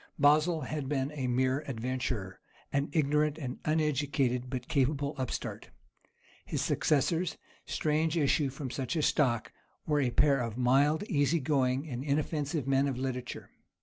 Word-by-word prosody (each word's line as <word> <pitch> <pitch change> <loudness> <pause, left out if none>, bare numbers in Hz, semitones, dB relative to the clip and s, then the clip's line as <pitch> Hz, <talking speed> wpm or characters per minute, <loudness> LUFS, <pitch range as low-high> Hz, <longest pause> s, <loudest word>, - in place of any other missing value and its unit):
Basil 155 +3 +4
had 150 -4 -4
been 140 -1 -1
a 135 -4 -3
mere 130 +2 +1
adventurer, 120 -6 -3 0.3
an 140 +1 +1
ignorant 150 0 +2
and 130 -5 -5
uneducated 140 -5 +1
but 125 -2 -4
capable 140 +1 +1
upstart. 130 - -4 0.7
His - - -2
successors—strange 160 0 0
issue 145 -1 +2
from 130 -1 -6
such 135 +4 -3
a 155 - +1
stock—were 145 +3 0
a 130 - +2
pair 140 +2 +3
of 115 -2 -3
mild, 140 +7 +3
easy 165 - +1
going, 135 0 +1
and 125 -3 -4
inoffensive 145 0 -1
men 135 +1 +3
of 135 -3 -2
literature. 125 -1 -4
140 Hz, 135 wpm, -30 LUFS, 130-150 Hz, 0.7 s, Basil